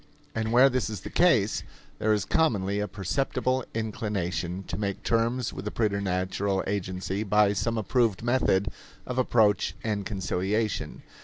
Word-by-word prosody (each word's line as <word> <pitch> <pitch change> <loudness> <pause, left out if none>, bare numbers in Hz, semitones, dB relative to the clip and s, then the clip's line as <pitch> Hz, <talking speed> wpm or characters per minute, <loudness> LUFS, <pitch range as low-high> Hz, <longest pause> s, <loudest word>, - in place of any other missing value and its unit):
And 110 0 -2
where 125 +3 +7
this 130 -4 0
is 105 -4 -5
the - - -8
case, 115 - +3 0.4
there 110 - +2
is 105 -3 +1
commonly 100 -11 +1
a 105 - -1
perceptible 130 +5 -1
inclination 95 -5 -2
to 85 - -5
make 100 0 -3
terms 115 +1 0
with - - -6
the 105 - -2
preternatural 100 -2 0
agency 95 0 -2
by 105 -1 +3
some 115 +3 -1
approved 110 0 +1
method 115 -5 +2 0.4
of 125 0 -2
approach 110 -5 +3
and 105 -2 -1
conciliation. 100 +2 -2
105 Hz, 145 wpm, -27 LUFS, 95-115 Hz, 0.4 s, where